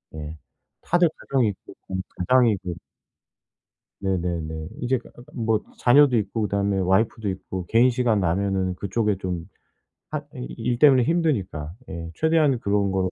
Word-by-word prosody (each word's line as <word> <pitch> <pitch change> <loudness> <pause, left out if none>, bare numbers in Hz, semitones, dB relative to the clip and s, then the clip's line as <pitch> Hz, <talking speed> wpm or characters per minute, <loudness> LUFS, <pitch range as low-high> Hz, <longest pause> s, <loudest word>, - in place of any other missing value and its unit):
예. 80 0 -7 0.4
다들 175 0 +3
가정이 130 -4 +1
있고 100 - -9 0.2
음 95 0 -1 0.2
가장이고 100 -3 +2 1.3
네네네. 85 -5 -2
이제 125 +1 +1 0.4
뭐 110 -2 +1 0.2
자녀도 130 +1 +5
있고 105 +2 -2
그다음에 100 -1 0
와이프도 100 +3 +1
있고 95 -1 -6
개인 115 +6 +4
시간 120 -4 +1
나면 95 +1 0
그 100 - -5
쪽에 105 0 +1
좀 90 -3 -4 0.7
핫 - - -3
이 - - -6
일 120 -1 -1
때문에 135 -5 +6
힘드니까 115 - 0 0.2
예 85 0 -6
최대한 160 -5 +3
그런 100 -2 +1
걸 95 -1 0
100 Hz, 280 characters per minute, -24 LUFS, 90-125 Hz, 1.3 s, 때문에